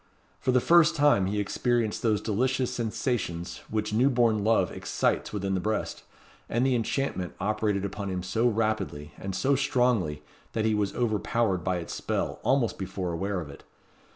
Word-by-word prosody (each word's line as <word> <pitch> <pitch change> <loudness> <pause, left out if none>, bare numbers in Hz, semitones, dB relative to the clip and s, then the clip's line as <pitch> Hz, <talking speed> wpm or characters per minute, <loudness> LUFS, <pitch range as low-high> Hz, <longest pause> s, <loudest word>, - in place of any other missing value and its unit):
For 130 - +1
the 125 - +4
first 170 +5 +5
time 145 - +4
he 105 +2 -1
experienced 115 +2 0
those 110 -3 +1
delicious 125 +4 0
sensations 110 -6 -2
which 110 -1 -2
new 125 +5 +4
born 115 -5 +2
love 115 +1 +3
excites - - -1
within 100 -2 -2
the 95 - +1
breast; 110 +4 -2 0.5
and 120 +3 +1
the 135 - +3
enchantment 115 -6 -1
operated 105 0 0
upon 100 0 -4
him 90 -1 -3
so 115 +6 +1
rapidly 110 -10 -1
and 95 -1 -4
so 135 +8 +2
strongly, 120 - +1 0.3
that 110 -1 0
he 110 - +2
was 105 -2 0
overpowered 110 -4 0
by 95 +1 0
its 85 - -6
spell - - -2
almost 125 -1 +1
before 95 -2 -3
aware 95 +3 -2
of 75 -4 -7
it. - - -13
110 Hz, 170 wpm, -27 LUFS, 95-120 Hz, 0.5 s, first